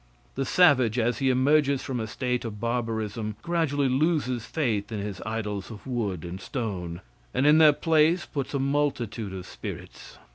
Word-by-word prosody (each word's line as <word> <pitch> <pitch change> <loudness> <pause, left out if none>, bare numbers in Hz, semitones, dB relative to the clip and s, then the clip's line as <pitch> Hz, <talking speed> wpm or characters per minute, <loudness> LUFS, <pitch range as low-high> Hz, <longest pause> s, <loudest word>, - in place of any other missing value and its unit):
The 135 - -2
savage 130 - +4
as 120 -1 +1
he 135 - +2
emerges 140 +1 +3
from 130 -3 -3
a 110 - -3
state 125 +2 -2
of 105 -3 -6
barbarism, 115 -2 -2
gradually 160 -5 +1
loses 130 -4 0
faith 115 -11 -1
in 110 - -3
his 100 -2 -5
idols 105 -3 -3
of 110 -3 -10
wood 105 -10 -2
and 90 +3 -6
stone, 90 -9 -4 0.3
and 135 - +2
in 150 +2 +6
their 155 -1 +8
place 160 +3 +2
puts 140 -1 -4
a - - +1
multitude 135 -7 -1
of 95 -1 -7
spirits. - - -9
125 Hz, 170 wpm, -26 LUFS, 105-145 Hz, 0.3 s, their